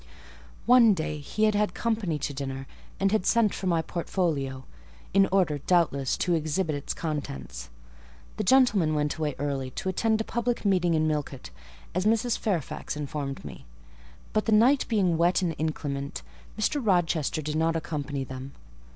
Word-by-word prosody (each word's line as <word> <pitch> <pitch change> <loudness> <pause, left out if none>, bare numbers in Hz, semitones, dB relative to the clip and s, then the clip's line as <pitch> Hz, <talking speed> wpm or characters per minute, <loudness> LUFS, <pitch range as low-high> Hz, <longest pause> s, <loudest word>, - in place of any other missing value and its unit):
One 235 -4 +6
day 155 -2 -3
he 180 +9 -3
had 215 0 +4
had 205 -2 0
company 215 -9 -1
to 145 0 -3
dinner, 135 -1 -5 0.3
and 195 0 +2
had 215 -3 +2
sent 225 0 +3
for 190 - -4
my 165 -2 +2
portfolio; 155 -7 -2 0.5
in 195 0 +5
order, 180 -7 +2
doubtless, 140 -5 +1
to 180 - +1
exhibit 160 +1 0
its 145 - -4
contents: 70 - -5 0.7
the 215 - -1
gentlemen 205 -10 +4
went 150 0 0
away 150 -3 -2
early, 135 -2 -2
to 190 - -4
attend 220 +3 +1
a - - 0
public 235 0 -2
meeting 180 -4 +3
at 155 - +2
Millcote, 145 - -3 0.4
as 185 +4 0
Mrs. 225 +2 +2
Fairfax 170 - -3
informed 140 - -4
me; 65 -4 -10 0.7
but 215 - +1
the 225 - 0
night 245 +6 +4
being 185 -7 +1
wet 175 +3 +3
and 170 -2 0
inclement, 140 - -3 0.3
Mr. 260 +6 0
Rochester 170 -6 +1
did 150 +1 -3
not 165 +1 +1
accompany 145 -4 -3
them. 130 +1 -8
165 Hz, 160 wpm, -27 LUFS, 145-205 Hz, 0.7 s, One